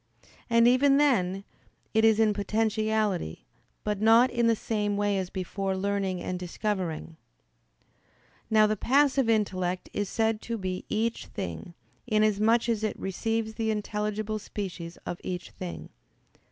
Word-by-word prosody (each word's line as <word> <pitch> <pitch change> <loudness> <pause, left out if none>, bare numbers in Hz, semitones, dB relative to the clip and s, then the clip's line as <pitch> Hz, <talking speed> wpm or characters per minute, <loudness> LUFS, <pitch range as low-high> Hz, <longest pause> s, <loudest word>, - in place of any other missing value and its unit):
And, 230 0 +5
even 275 +3 +5
then, 195 -10 +2 0.5
it 220 0 +3
is 220 -1 +5
in 220 -1 +4
potentiality, 215 - -1 0.4
but 210 -1 -2
not 230 +3 +6
in 235 -1 +2
the 230 - +4
same 210 -2 -1
way 205 0 +1
as 185 -1 -3
before 190 +1 -3
learning 195 -2 -1
and 180 0 -3
discovering." 180 -3 -3 1.3
Now, 215 -1 +5
the 215 0 +1
passive 270 +2 +3
intellect 185 -4 0
is 205 -2 -2
said 220 -1 0
to 230 -1 -4
be 185 -2 -4
each 225 +2 -1
thing, 190 -3 -6 0.3
inasmuch 215 +1 +3
as 225 -2 0
it 215 - -1
receives 220 +3 -2
the 220 0 -2
intelligible 210 0 -2
species 180 -5 -6
of 175 - -5
each 180 -1 -5
thing. 180 -2 -7
210 Hz, 140 wpm, -28 LUFS, 190-225 Hz, 1.3 s, not